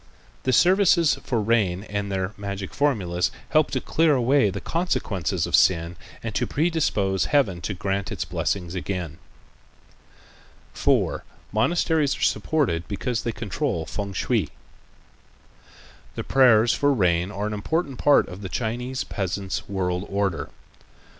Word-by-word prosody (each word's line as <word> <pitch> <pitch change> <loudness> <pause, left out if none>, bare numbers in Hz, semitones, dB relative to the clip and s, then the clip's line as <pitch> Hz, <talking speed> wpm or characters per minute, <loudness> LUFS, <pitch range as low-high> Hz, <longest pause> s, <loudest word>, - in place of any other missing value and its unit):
The 130 - +2
services 175 - +4
for 120 - -1
rain 105 -5 +1
with 100 0 -3
their 95 +1 -2
magic 100 -1 -6
formulas 95 -12 +1 0.2
help 155 -1 +3
to - - -1
clear 160 -2 +2
away 130 -2 +3
the 100 +1 -4
consequences 165 - -1
of - - +2
sin 85 -1 +3 0.3
and 115 -2 -4
to - - 0
predispose 145 - +1
Heaven 105 -12 +1
to 100 - -3
grant 100 +2 -2
its - - -3
blessings 90 -3 -2
again. 90 -4 -4 1.5
4. - - +1 0.3
Monasteries 150 +3 +1
Are - - -11
Supported 125 - 0
Because 110 +3 -2
They 115 - -2
Control 110 - -3
Fêng 100 +1 -5
shui - - 0 1.7
The - - -4
prayers 120 -4 +5
for 145 0 +2
rain 90 -4 +2
are 105 0 -3
an 105 - -2
important 140 +6 -2
part 145 - +4
of 90 +2 -9
the 95 - -6
Chinese 125 +5 -3
peasant's 95 0 -4
world 90 -1 -2
order. 100 -3 -1
105 Hz, 135 wpm, -24 LUFS, 95-135 Hz, 1.7 s, prayers